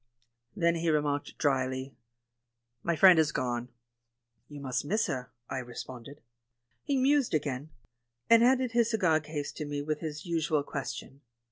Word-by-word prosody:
Then 170 0 +2
he 165 0 0
remarked 145 -2 0
drily, 130 -2 -1 0.9
"My 170 +3 0
friend 180 +1 +7
has 155 -1 +3
gone." 120 -2 -2 0.8
"You 145 -1 -9
must 130 -3 -2
miss 210 +10 +1
her," 125 -1 -4 0.2
I 130 - -3
responded. 125 +2 -9 0.6
He 280 -2 0
mused 270 - +3
again, 145 -1 -2 0.6
and 230 0 +7
handed 255 0 +3
his 235 -1 +3
cigar 180 -9 +3
case 150 -1 -5
to 155 - -6
me 145 0 -3
with 155 0 -2
his 155 0 -6
usual 160 -3 0
question. 140 0 -6
150 Hz, 145 wpm, -30 LUFS, 135-170 Hz, 0.9 s, friend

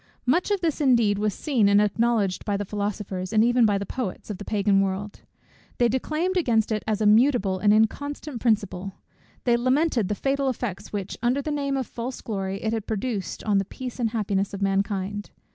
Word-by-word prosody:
Much 320 +11 +2
of 405 -2 0
this 325 -3 0
indeed 235 -7 +3
was 210 0 +1
seen 230 - +1
and 200 0 +5
acknowledged 210 -2 +1
by 205 -2 -1
the 205 - -3
philosophers, 200 -2 -3
and 220 0 +4
even 240 -1 +4
by 205 -1 +2
the 200 - -4
poets, 215 -2 -5
of 200 - -6
the - - -6
Pagan 200 -1 +2
world. 195 +1 -3 0.6
They 240 - +4
declaimed 310 - -1
against 230 -10 +2
it 215 -1 0
as 215 -1 0
a - - +2
mutable 215 -3 +4
and 205 +2 +4
inconsistent 255 +4 0
principle; 200 -4 0 0.5
they 240 -2 +3
lamented 255 - +2
the 210 - -1
fatal 275 +3 0
effects 210 -5 -4
which, 200 -2 -4
under 245 +3 +2
the 305 - -2
name 280 -2 -1
of 260 - -1
false 245 +3 -6
glory, 195 -3 -4
it 220 0 0
had 220 -2 -3
produced 215 -3 -3
on 205 -2 +2
the 195 - -1
peace 255 +5 -7
and 230 -2 +1
happiness 200 -3 -1
of 200 - -7
mankind. 195 +1 -1
215 Hz, 200 wpm, -25 LUFS, 200-250 Hz, 0.6 s, and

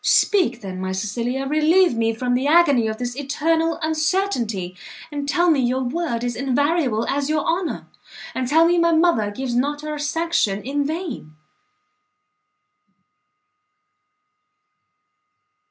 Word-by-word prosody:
Speak, 320 - +2
then, 185 -2 -6
my 190 0 -3
Cecilia! 235 +7 -2
relieve 310 +2 +3
me 225 0 +1
from 245 +2 -2
the 255 +3 0
agony 290 -8 +4
of 220 0 -3
this 245 0 -4
eternal 320 +4 0
uncertainty, 310 - -1 0.4
and 285 -1 -4
tell 345 +3 +3
me 300 - +2
your 255 +1 0
word 255 -3 -2
is 240 -1 -2
invariable 275 -2 0
as 280 +1 -1
your 305 -1 0
honour, 340 +1 -2 0.5
and 255 -1 -2
tell 320 +5 +4
me 345 +1 +3
my 335 0 +3
mother 320 -11 +2
gives 240 +3 -4
not 290 +4 0
her 300 -1 -5
sanction 295 -10 0
in 285 +3 -1
vain!" 310 - -5
280 Hz, 130 wpm, -21 LUFS, 240-325 Hz, 0.5 s, agony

